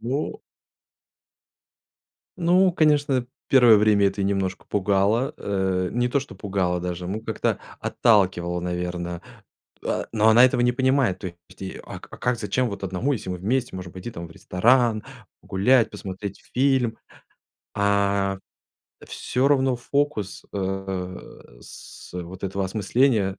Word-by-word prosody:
Но. 130 Hz, +6 st, -2 dB, 2.1 s
Ну, 180 Hz, +2 st, +4 dB
конечно, 145 Hz, -6 st, +2 dB, 0.2 s
первое 120 Hz, -5 st, +7 dB
время 105 Hz, -1 st, +4 dB
это 100 Hz, +1 st, -2 dB
ее 95 Hz, -, +1 dB
немножко 95 Hz, -2 st, -2 dB
пугало. 100 Hz, +6 st, +1 dB
Э, 95 Hz, -2 st, -1 dB
не 120 Hz, +1 st, +1 dB
то, 140 Hz, +3 st, +1 dB
что 135 Hz, -, -10 dB
пугало, 95 Hz, -2 st, -1 dB
даже, 90 Hz, 0 st, -4 dB
ну, 100 Hz, +4 st, -3 dB
как-то 110 Hz, -, -1 dB, 0.2 s
отталкивало, 90 Hz, -5 st, +2 dB
наверно, 90 Hz, 0 st, -4 dB, 0.6 s
а, -, -, -1 dB
но 110 Hz, -1 st, +3 dB
она 115 Hz, +3 st, +7 dB
этого 125 Hz, -1 st, +3 dB
не 125 Hz, 0 st, +3 dB
понимает. 130 Hz, -6 st, +2 dB
То 95 Hz, -, -4 dB, 0.2 s
есть, -, -, -14 dB
и, 95 Hz, -, -6 dB
а -, -, -8 dB
ка -, -, -12 dB
как, 125 Hz, -1 st, 0 dB
зачем 115 Hz, +4 st, 0 dB
вот 100 Hz, -1 st, -6 dB
одному, 95 Hz, +9 st, -1 dB
если 105 Hz, -7 st, -4 dB
мы 90 Hz, -, -3 dB
вместе 120 Hz, +6 st, -1 dB
можем 90 Hz, -2 st, -8 dB
пойти, 95 Hz, +5 st, -7 dB
там, 85 Hz, -6 st, -7 dB
в -, -, -14 dB
ресторан, 115 Hz, +5 st, +2 dB, 0.4 s
погулять, 115 Hz, +5 st, +3 dB
посмотреть 100 Hz, -1 st, -7 dB
фильм? 130 Hz, -3 st, +2 dB, 0.8 s
А, 100 Hz, -1 st, +1 dB, 0.7 s
э, -, -, -12 dB
всё 130 Hz, +2 st, 0 dB
равно 135 Hz, -2 st, +3 dB
фокус, 120 Hz, -6 st, -2 dB
э, 95 Hz, -2 st, -3 dB, 0.4 s
с -, -, -12 dB
вот 90 Hz, +2 st, -6 dB
этого 95 Hz, 0 st, -2 dB
осмысления 105 Hz, +1 st, +1 dB
100 Hz, 140 wpm, -24 LUFS, 95-125 Hz, 2.1 s, первое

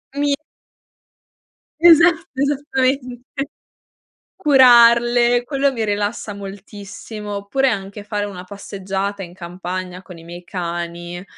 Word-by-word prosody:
Mi 285 Hz, 0 st, +1 dB, 1.4 s
Esatto, 335 Hz, 0 st, +6 dB
esattamente. 265 Hz, -2 st, -1 dB, 1.1 s
Curarle, 240 Hz, -, +5 dB
quello 275 Hz, +2 st, +1 dB
mi 230 Hz, -4 st, -2 dB
rilassa 205 Hz, +1 st, -2 dB
moltissimo, 205 Hz, +1 st, -8 dB
oppure 230 Hz, +7 st, 0 dB
anche 200 Hz, -2 st, -5 dB
fare 205 Hz, 0 st, -3 dB
una 190 Hz, -3 st, -8 dB
passeggiata 195 Hz, 0 st, -5 dB
in 175 Hz, -1 st, -10 dB
campagna 180 Hz, +1 st, -6 dB
con 180 Hz, -2 st, -12 dB
i 165 Hz, -, -13 dB
miei 175 Hz, +1 st, -10 dB
cani. 175 Hz, 0 st, -5 dB
205 Hz, 100 wpm, -20 LUFS, 185-255 Hz, 1.4 s, Esatto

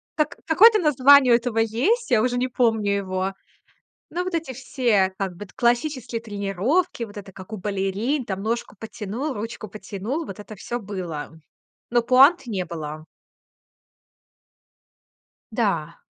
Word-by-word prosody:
Как 305 Hz, -1 st, 0 dB
какое-то 425 Hz, +7 st, +6 dB
название 280 Hz, -5 st, +6 dB
у -, -, +8 dB
этого 235 Hz, -1 st, -1 dB
есть, 265 Hz, -, +1 dB
я 220 Hz, -, +5 dB
уже 245 Hz, +1 st, 0 dB
не 250 Hz, +1 st, +1 dB
помню 225 Hz, -5 st, +1 dB
его. 190 Hz, -1 st, -2 dB, 0.8 s
Но 355 Hz, +2 st, -2 dB
вот 370 Hz, -, -4 dB
эти 325 Hz, -5 st, -2 dB
все, 235 Hz, -6 st, +1 dB
как 195 Hz, -2 st, -2 dB
бы, 205 Hz, -, -7 dB
т 195 Hz, -, -20 dB
классические 240 Hz, 0 st, 0 dB
тренировки, 220 Hz, -, -1 dB
вот 205 Hz, -3 st, -9 dB
это 200 Hz, -1 st, -9 dB
как 190 Hz, +3 st, -11 dB
у -, -, -4 dB
балерин, 205 Hz, +8 st, -1 dB
там 195 Hz, -2 st, -4 dB
ножку 225 Hz, 0 st, -3 dB
потянул, 225 Hz, +6 st, -5 dB
ручку 215 Hz, -1 st, -6 dB
потянул. 215 Hz, -, -5 dB
Вот 195 Hz, -4 st, -9 dB
это 210 Hz, +1 st, -9 dB
всё 240 Hz, +5 st, -5 dB
было. 185 Hz, -8 st, -6 dB, 0.6 s
Ну, 240 Hz, -1 st, +3 dB
пуант 265 Hz, +8 st, +5 dB
не 195 Hz, -5 st, -2 dB
было. 155 Hz, -2 st, -7 dB, 2.5 s
Да. 195 Hz, -8 st, -1 dB
225 Hz, 145 wpm, -23 LUFS, 195-260 Hz, 2.5 s, у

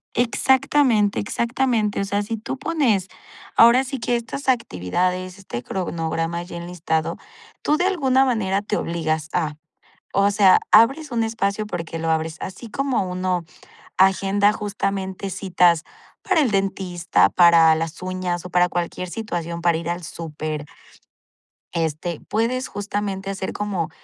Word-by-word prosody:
Exactamente, 245 Hz, -2 st, +2 dB
exactamente. 235 Hz, -2 st, 0 dB
O -, -, -1 dB
sea, 200 Hz, +1 st, 0 dB
si 225 Hz, +2 st, -4 dB
tú 255 Hz, +5 st, -5 dB
pones, 250 Hz, -, +1 dB, 0.5 s
ahora 235 Hz, +3 st, +7 dB
sí 270 Hz, -1 st, -5 dB
que 240 Hz, +1 st, 0 dB
estas 255 Hz, +3 st, -4 dB
actividades, 185 Hz, -, -1 dB
este 125 Hz, -11 st, -6 dB
cronograma 165 Hz, 0 st, -2 dB
ya 175 Hz, -1 st, -8 dB
enlistado, 170 Hz, -1 st, -2 dB, 0.4 s
tú, 300 Hz, -, +2 dB
de 355 Hz, -, +1 dB
alguna 270 Hz, -8 st, +3 dB
manera 200 Hz, -6 st, 0 dB
te 210 Hz, -, -2 dB
obligas 160 Hz, -2 st, -2 dB
a, 155 Hz, -4 st, -1 dB, 0.6 s
o 200 Hz, +1 st, +3 dB
sea, 195 Hz, -2 st, +6 dB
abres 270 Hz, +7 st, +5 dB
un 230 Hz, -1 st, +1 dB
espacio 215 Hz, -2 st, -1 dB
porque 165 Hz, -4 st, -5 dB
lo 165 Hz, 0 st, -2 dB
abres, 160 Hz, +1 st, -1 dB
así 225 Hz, +4 st, -7 dB
como 275 Hz, -2 st, 0 dB
uno 180 Hz, -1 st, -1 dB, 0.5 s
agenda, 195 Hz, +2 st, +3 dB
justamente 195 Hz, -2 st, -3 dB
citas 175 Hz, -3 st, +2 dB, 0.4 s
para 375 Hz, -5 st, +2 dB
el 265 Hz, -, +2 dB
dentista, 190 Hz, -3 st, +1 dB
para 170 Hz, -2 st, +6 dB
las 165 Hz, +2 st, -4 dB
uñas 185 Hz, -1 st, -3 dB
o 180 Hz, -, -8 dB
para 180 Hz, 0 st, +3 dB
cualquier 175 Hz, +1 st, -3 dB
situación, 170 Hz, -6 st, -4 dB
para 170 Hz, -1 st, +2 dB
ir 170 Hz, 0 st, -5 dB
al 175 Hz, +1 st, -3 dB
súper, 155 Hz, -2 st, -5 dB, 1.1 s
este, 165 Hz, 0 st, -2 dB
puedes, 245 Hz, +4 st, 0 dB
justamente, 200 Hz, -1 st, -4 dB
hacer 190 Hz, -1 st, -4 dB
como 195 Hz, -6 st, -2 dB
190 Hz, 140 wpm, -22 LUFS, 170-225 Hz, 1.1 s, ahora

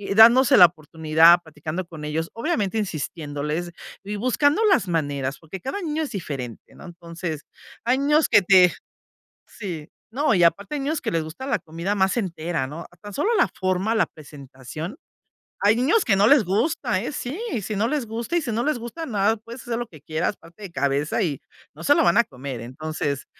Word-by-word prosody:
dándose 235 Hz, +4 st, +7 dB
la 180 Hz, -, +11 dB
oportunidad, 160 Hz, +1 st, +4 dB
platicando 160 Hz, +3 st, -5 dB
con 160 Hz, -3 st, -9 dB
ellos, 160 Hz, +2 st, -2 dB
obviamente 225 Hz, -, -1 dB
insistiéndoles 155 Hz, -3 st, -3 dB, 0.3 s
y 205 Hz, +1 st, -5 dB
buscando 285 Hz, -, +2 dB
las 200 Hz, -, +3 dB
maneras, 145 Hz, -5 st, -2 dB
porque 165 Hz, +4 st, -9 dB
cada 330 Hz, -, -4 dB
niño 315 Hz, -1 st, -2 dB
es 290 Hz, -, -5 dB
diferente, 135 Hz, -, -6 dB
¿no? -, -, -13 dB
Entonces, 170 Hz, -2 st, -6 dB, 0.4 s
hay 250 Hz, +3 st, +2 dB
niños 295 Hz, +3 st, +3 dB
que 205 Hz, -, +6 dB
te 180 Hz, -1 st, +6 dB, 0.7 s
Sí, 175 Hz, -8 st, -7 dB, 0.2 s
no, 265 Hz, -1 st, +1 dB
y 175 Hz, -2 st, +3 dB
aparte 200 Hz, -, +2 dB
hay 285 Hz, -, -2 dB
niños 300 Hz, +3 st, -1 dB
que -, -, -2 dB
les 165 Hz, -1 st, 0 dB
gusta 160 Hz, +12 st, -8 dB
la 275 Hz, -, 0 dB
comida 170 Hz, +4 st, -4 dB
más 190 Hz, +3 st, +1 dB
entera, 165 Hz, -, -2 dB
¿no? 160 Hz, +4 st, -8 dB, 0.2 s
Tan 205 Hz, -1 st, -9 dB
solo 425 Hz, -, 0 dB
la 365 Hz, -, +4 dB
forma, 185 Hz, +4 st, 0 dB
la 220 Hz, -, +3 dB
presentación. 145 Hz, -, -9 dB, 0.6 s
Hay 205 Hz, +2 st, +4 dB
niños 295 Hz, -, +2 dB
que 200 Hz, -, +3 dB
no 205 Hz, +2 st, +5 dB
les 280 Hz, -5 st, +6 dB
gusta, 220 Hz, -, 0 dB
¿eh? -, -, -3 dB
Sí, 260 Hz, +4 st, -4 dB, 0.3 s
si 215 Hz, -, -4 dB
no 220 Hz, +3 st, +1 dB
les 285 Hz, -4 st, -1 dB
gusta, 230 Hz, +9 st, -3 dB
y 335 Hz, -, +1 dB
si 240 Hz, -5 st, -3 dB
no 230 Hz, +2 st, 0 dB
les 305 Hz, -4 st, 0 dB
gusta, 240 Hz, +8 st, -6 dB
nada, 210 Hz, 0 st, +1 dB
puedes 230 Hz, +3 st, -10 dB
hacer 235 Hz, -1 st, -3 dB
lo 240 Hz, -, -4 dB
que 155 Hz, -, -15 dB
quieras, 160 Hz, +6 st, -2 dB
pararte 170 Hz, +5 st, -17 dB
de 185 Hz, -, -7 dB
cabeza 140 Hz, -, 0 dB
y 150 Hz, -8 st, -2 dB, 0.3 s
no 155 Hz, -, -11 dB
se 290 Hz, -, +5 dB
lo -, -, +4 dB
van 170 Hz, -1 st, +3 dB
a 235 Hz, -, +7 dB
comer. 130 Hz, -1 st, -7 dB
Entonces, 140 Hz, +3 st, -4 dB
185 Hz, 195 wpm, -23 LUFS, 155-235 Hz, 0.7 s, la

